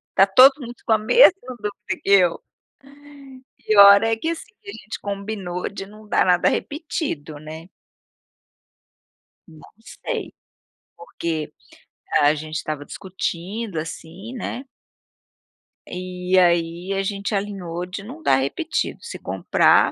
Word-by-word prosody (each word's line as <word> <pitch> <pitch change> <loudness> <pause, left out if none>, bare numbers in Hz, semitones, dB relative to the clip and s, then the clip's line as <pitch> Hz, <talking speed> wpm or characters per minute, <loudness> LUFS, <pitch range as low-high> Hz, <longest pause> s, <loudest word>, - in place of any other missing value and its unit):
tá 195 - +7
todo 255 +8 +8
mundo 240 0 -8
com 225 - +3
a - - +5
mesma 295 - +6 0.3
dúvida 210 0 -5
que - - -5
eu. 185 -4 +4 1.2
Pior 200 0 +8
é 225 0 +2
que 320 +9 -3
assim, 335 +5 -6
a 400 - -7
gente 215 - -8
combinou 200 -3 -4
de 195 -1 -7
não 215 +2 -15
dar - - +2
nada 180 -1 +4
repetido, 285 - -4
né. 160 +2 -10 1.8
Não 160 -3 -16 0.4
sei, - - -3 0.6
porque 165 -2 -5 0.7
a 145 +1 +5
gente 155 +1 -6
estava 150 -1 -4
discutindo 190 +1 -5
assim, 165 +7 -8
né. 255 +2 -5 1.2
E 180 0 -2
aí 175 +1 +2
a 195 - 0
gente 200 +1 -3
alinhou 190 -4 -3
de 185 +2 -7
não 265 +10 -10
dar - - +3
repetido. 140 - -2
Se - - -7
comprar, - - +3
195 Hz, 125 wpm, -22 LUFS, 170-215 Hz, 1.8 s, todo